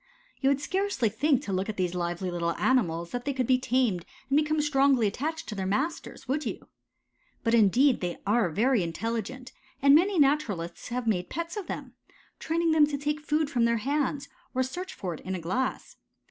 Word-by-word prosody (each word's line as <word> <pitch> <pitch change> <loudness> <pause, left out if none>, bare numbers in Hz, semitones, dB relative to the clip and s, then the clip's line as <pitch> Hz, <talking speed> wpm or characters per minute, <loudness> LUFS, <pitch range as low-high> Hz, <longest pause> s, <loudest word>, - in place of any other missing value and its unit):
You 270 - +2
would 280 0 +2
scarcely 375 - 0
think 270 +5 +1
to 195 - -4
look 190 +3 -1
at 215 - -4
these 180 -2 0
lively 175 +1 -2
little 170 -1 -1
animals 170 -10 +1
that 245 0 -3
they 280 - -1
could 260 -1 0
be 255 +1 +3
tamed 245 -8 +1 0.3
and - - +4
become 310 0 +2
strongly 275 -5 +3
attached 305 +10 -2
to - - -4
their 190 -2 -3
masters, 275 - -2
would 290 +4 0
you? - - -6 0.7
But 230 -1 +1
indeed 235 +5 +4
they 175 -1 -3
are 210 -2 +2
very 230 +7 +2
intelligent 230 +8 -4 0.3
and 280 0 +6
many 365 +5 +4
naturalists 270 - +1
have 245 0 -3
made 180 -5 0
pets 335 +1 -4
of 410 -4 -5
them, - - -6 0.5
training 330 +1 0
them 310 -2 +5
to 290 -1 -3
take 295 +1 -2
food 305 0 +1
from 240 -4 +1
their 235 0 +2
hands 280 +3 -1 0.3
or 260 - +2
search 360 +9 -5
for 180 -3 -5
it 155 - -8
in 190 0 -4
a - - -4
glass. 245 +11 -3
255 Hz, 200 wpm, -28 LUFS, 195-295 Hz, 0.7 s, and